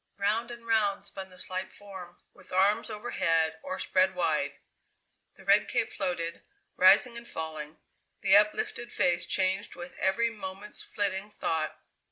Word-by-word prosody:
Round 215 +4 0
and 235 -1 -9
round 210 -4 +2
spun 195 -1 -3
the 185 - -15
slight 185 0 -3
form, 190 -4 -10 0.2
with - - -15
arms 195 +4 +3
over 215 +2 -6
head 160 -2 +1
or 185 - -4
spread 190 0 +2
wide. 155 -5 0 0.8
The - - -17
red - - +5
cape - - 0
floated, 170 -3 -3 0.3
rising 200 +6 +6
and 235 0 -9
falling; 155 -1 -6 0.4
the 195 -1 +6
uplifted 210 +3 +2
face 180 -3 +1
changed 190 +2 0
with 175 +1 -9
every 230 +5 +2
moment's 195 -1 -6
flitting 200 0 -1
thought. 160 -6 -2
190 Hz, 150 wpm, -29 LUFS, 175-210 Hz, 0.8 s, rising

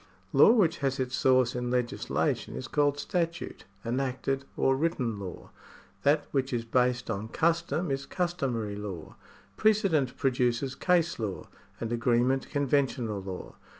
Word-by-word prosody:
Law 140 - +8
which 175 -8 +3
has 135 -1 -1
its 130 -1 -1
source 130 -2 +3
in 125 0 -2
legislation 125 - -1
is 65 - -5
called 145 -1 +2
statute, 170 0 -3 0.2
enacted, 135 +2 -1
or 135 - +3
written 130 -8 -1
law. 95 -3 -8 0.5
That 145 +4 +3
which 135 -1 0
is 120 -2 -1
based 125 0 +1
on 105 +1 -3
custom 170 +3 0
is 135 0 -2
customary 135 - -2
law. 100 -6 -7 0.4
Precedent 195 - +2
produces 125 -1 +1
case 170 -1 +1
law, 105 -4 -4 0.3
and 115 0 -3
agreement 120 +3 +1
conventional 135 -7 0
law. 95 -1 -7
130 Hz, 135 wpm, -29 LUFS, 120-145 Hz, 0.5 s, Law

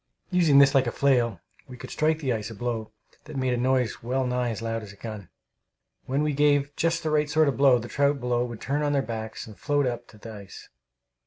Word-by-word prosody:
Using 170 -6 +4
this 140 0 +7
like 135 -3 +3
a - - 0
flail, 120 -9 +1 0.3
we 125 -1 -10
could - - -9
strike 155 +1 +1
the 135 -6 -1
ice 110 -1 -4
a 115 - -9
blow 115 0 -3 0.3
that 155 - -10
made 130 -1 0
a - - 0
noise 125 -2 0
well 130 +3 -1
nigh 125 -1 0
as 110 - -4
loud 115 0 -3
as 105 -2 -10
a - - -14
gun. 105 -3 -8 0.8
When 135 +3 0
we 150 -1 0
gave 145 0 +2
just 165 0 0
the 155 - -1
right 150 -1 +2
sort 155 +1 +3
of 140 - +1
blow, 135 -2 +5
the 120 0 -6
trout 140 +2 +1
below 120 -1 0
would 120 -3 -7
turn 145 +2 -1
on 145 -1 0
their 140 -1 +1
backs 110 -2 -6
and 110 - -12
float 145 +3 0
up 120 -1 -3
to 110 - -17
the 110 +1 -10
ice. 100 -3 -11
125 Hz, 245 wpm, -26 LUFS, 115-145 Hz, 0.8 s, this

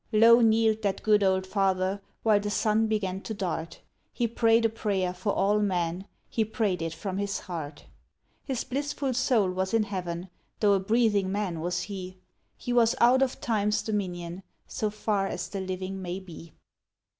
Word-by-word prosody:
Low 230 +2 +7
kneel'd 220 -1 +3
that 200 -2 -1
good 210 -1 +4
old 190 -1 +2
Father 190 0 0 0.2
while 215 -2 +4
the 205 0 -3
sun 220 +1 +2
began 195 -3 -1
to 220 - -5
dart; 165 -4 -4 0.3
He 240 - 0
pray'd 230 0 +3
a - - +4
prayer 195 -5 -1
for 185 +3 -2
all 205 +2 +2
men, 180 -2 -1 0.2
he 225 - 0
pray'd 210 -5 -1
it 165 0 -2
from 190 +3 -4
his 200 -1 -2
heart. 160 -4 -7 0.6
His 265 -4 -2
blissful 280 0 -2
soul 245 -6 +2
was 190 +3 -1
in 225 - +3
Heaven, 180 -3 -4 0.3
tho' 205 -2 +4
a 195 - +3
breathing 205 -1 +2
man 195 -5 -2
was 175 +2 -2
he; 185 -2 -7 0.4
He 245 - -3
was 230 -2 +4
out 250 +3 +5
of 265 -1 0
time's 210 -2 0
dominion, 180 -4 -3 0.2
so 215 - -2
far 205 -2 -1
as - - -4
the 195 - -4
living 190 +1 -4
may 180 +1 -4
be. 170 -3 -12
200 Hz, 175 wpm, -27 LUFS, 185-220 Hz, 0.6 s, Low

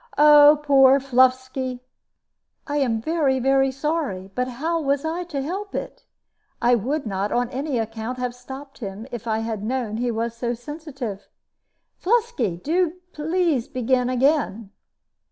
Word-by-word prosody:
Oh, 295 0 +8
poor 270 -1 +6
Fluffsky!" 260 -1 +1 0.9
"I 290 0 -2
am 245 -6 +1
very, 295 -4 +1
very 270 +1 +3
sorry. 270 - -3
But 250 +3 -1
how 320 +7 -2
was 280 0 0
I 340 +3 -2
to 285 -5 -4
help 390 +7 -5
it? - - -6 0.5
I 240 +1 +3
would 265 +6 0
not, 200 -1 -2
on 245 0 0
any 275 0 -2
account, 225 +2 -4
have 250 -1 -2
stopped 265 +3 -10
him 205 -1 -6
if 235 -1 -6
I 220 -1 +1
had 220 -3 -4
known 230 -2 -2
he 245 +1 -1
was 230 0 -2
so 240 0 -2
sensitive. 265 -6 -7 0.7
Fluffsky, 460 - 0
do 340 +2 +1 0.2
please 315 -4 0
to - - -32
begin 250 0 +1
again." 255 -6 +1
260 Hz, 150 wpm, -23 LUFS, 235-295 Hz, 0.9 s, Oh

